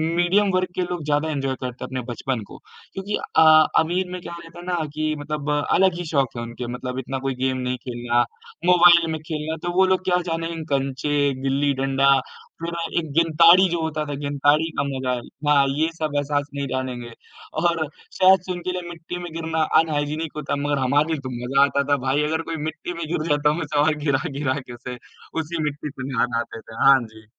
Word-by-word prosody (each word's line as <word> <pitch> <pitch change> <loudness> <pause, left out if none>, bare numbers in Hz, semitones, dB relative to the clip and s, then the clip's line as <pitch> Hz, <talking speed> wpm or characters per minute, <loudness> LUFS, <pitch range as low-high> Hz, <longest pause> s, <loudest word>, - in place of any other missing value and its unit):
Medium 190 +4 +3
वर्ग 185 0 +1
के 185 - 0
लोग 175 -3 -3
ज़्यादा 150 +1 +1
एन्जॉय 135 -3 -1
करते 125 -1 -5
हैं - - -4
अपने 130 -1 -3
बचपन 120 -1 -3
को, - - -11 0.4
क्योंकि 200 +2 -2 0.2
अ, 155 -1 +7
अमीर 180 +3 0
में 180 -1 -5
क्या 170 - -7
रहता 165 +1 -12
है 175 - -10
ना 180 -1 -1 0.2
कि 155 0 -1
मतलब 150 0 -4 0.2
अलग 190 0 +4
ही 175 - -4
शौक़ 135 -5 0
है 120 - -3
उनके 120 +1 -6
मतलब 125 +1 -4
इतना 135 +1 -4
कोई 135 - -1
गेम 130 0 0
नहीं 125 0 -2
खेलना, 120 0 +1 0.4
मोबाइल 175 -1 +7
में 160 - -3
खेलना 155 0 -4
तो 175 - -1
वो 190 +1 +5
लोग 185 0 +1
क्या 180 -1 +3
जानेंगे 165 0 -3
कँचे, 140 +1 0
गिल्ली-डंडा, 135 0 +1 0.5
फिर 170 0 -3 0.3
एक 160 -3 -6
गिंताड़ी 170 +3 +6
जो 170 -1 -1
होता 155 -1 -2
था 145 - -4
गिंताड़ी 145 +3 +2
का - - +2
मजा, 130 -2 -2 0.4
हाँ, 140 -2 +5
ये 160 +1 +2
सब 155 -2 -2
एहसास 145 0 0
नहीं 140 -1 -2
जानेंगे 125 -2 -4 0.5
और 170 -2 +1 0.3
शायद 190 -1 +5
से - - -2
उनके 175 +1 -4
लिए 180 -1 -5
मिट्टी 170 +1 -7
में 175 - -7
गिरना 160 -1 -1 0.2
अनहाइजीनिक 155 0 -1
होता 150 - -2
मगर 145 -1 +1
हमारे 145 +3 +3
लिए 155 - -2
तो 130 - -4 0.2
मजा 135 +2 +4
आता 140 0 0
था 145 - +4
भाई 140 +3 +2
अगर 160 +2 0
कोई - - -2
मिट्टी 160 +3 -5
में 170 -1 -4
गिर 155 0 -2
जाता 145 0 +3
हम 155 +3 -1
उसे 150 -2 -1
वहाँ 155 +2 +4
गिरा-गिरा 140 -1 0
के 125 -2 -10
उसे 125 +1 -7 0.4
उसी 160 0 -4
मिट्टी 150 0 -3
से 130 -2 -7
नहा, 125 - +3
नहा 120 -1 -2
आते 115 -1 -5
थे। 110 - -13
हाँ 135 -1 +8
जी। 110 0 -16
150 Hz, 210 wpm, -23 LUFS, 135-165 Hz, 0.5 s, हाँ